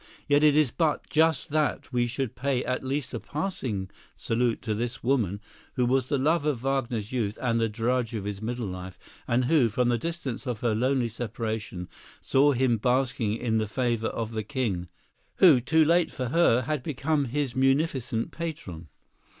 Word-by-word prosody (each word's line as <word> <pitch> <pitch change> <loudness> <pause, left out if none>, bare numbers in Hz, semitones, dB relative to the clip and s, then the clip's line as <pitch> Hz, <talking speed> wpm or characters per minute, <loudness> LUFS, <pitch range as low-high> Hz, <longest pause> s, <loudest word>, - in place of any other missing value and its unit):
Yet 145 0 +4
it 150 -1 +5
is 150 -5 +4
but 160 -3 0
just 160 +1 +2
that 150 -3 -1
we 120 -1 +2
should 125 0 -3
pay 130 0 -1
at 130 +1 -2
least 135 0 -3
a - - -2
passing 130 - -3 0.3
salute 115 0 0
to 110 - -1
this 120 +3 -3
woman 115 -7 +1 0.4
who 125 - +2
was 130 +1 +1
the 140 - +2
love 155 +4 +2
of 145 -5 -1
Wagner's 125 -6 -1
youth 110 -5 -1
and 115 -2 +1
the 115 0 +1
drudge 115 +1 -1
of 105 - -3
his 100 0 -5
middle 120 +1 -3
life, 90 -1 -7 0.3
and 120 +2 +2
who, 135 -4 +4
from 120 +3 +1
the 120 -1 +1
distance 145 -4 -4
of 120 -3 -3
her 120 -3 +1
lonely 125 +2 +1
separation, 110 -5 -4 0.3
saw 140 +2 +3
him 125 -2 +2
basking 125 -2 +1
in 110 -2 0
the 110 - -1
favor 115 0 0
of 115 -1 -3
the 110 -1 -3
king, 105 - -2 0.5
who, 160 -9 +7
too 160 +5 +3
late 170 +2 +3
for 125 -4 -4
her, 130 -5 +4
had 150 +2 -2
become 145 +1 0
his 135 0 -2
munificent 135 -3 +1
patron. 150 - -6
125 Hz, 180 wpm, -27 LUFS, 115-140 Hz, 0.5 s, who